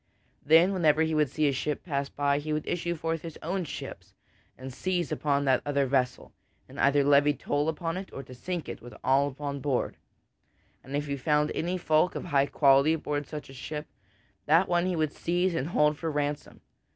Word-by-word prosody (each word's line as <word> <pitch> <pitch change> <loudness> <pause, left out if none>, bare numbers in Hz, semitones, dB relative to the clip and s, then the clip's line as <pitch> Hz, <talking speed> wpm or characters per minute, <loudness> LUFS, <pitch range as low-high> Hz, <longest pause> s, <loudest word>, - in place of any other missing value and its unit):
Then, 165 +6 +5
whenever 160 -4 +3
he 160 0 0
would 150 -3 +2
see 155 +4 -2
such 145 - +4
a 135 - -3
ship 150 - -2
pass 140 -4 -2
by, 145 0 0
he 155 +1 -5
would 150 0 -1
issue 170 0 -1
forth 165 0 -2
in - - -5
his 160 - -13
own 180 +2 -2
ships - - -8 0.4
and 130 0 -8
seize 175 -1 -2
upon 140 -1 0
that 130 -1 +3
other 140 -1 +1
vessel, 130 -1 -1 0.3
and - - -11
either 140 0 +4
levy 145 +1 +4
toll 145 +3 -1
upon 165 +2 -3
it 190 0 -7
or 135 - -8
sink 175 +6 -5
it - - -7
with 120 -2 -11
all 135 +2 +3
upon 140 0 -5
board. 135 -2 -1 0.9
And 135 +2 -6
if 145 +1 -1
he 140 -1 -2
found 150 +2 +1
any 175 +3 -1
folk 160 +1 +2
of - - -4
high 140 -4 +2
quality 140 +2 +4
aboard 150 -2 -3
such 150 -1 -7
a 135 - -12
ship, 150 +4 -6 0.6
that 165 +5 +5
one 175 0 +1
he 185 - 0
would 155 -2 0
seize 175 +2 0
and 155 -3 -1
hold 150 -2 +2
for 165 - -2
ransom. 145 -1 -3
150 Hz, 210 wpm, -28 LUFS, 140-165 Hz, 0.9 s, Then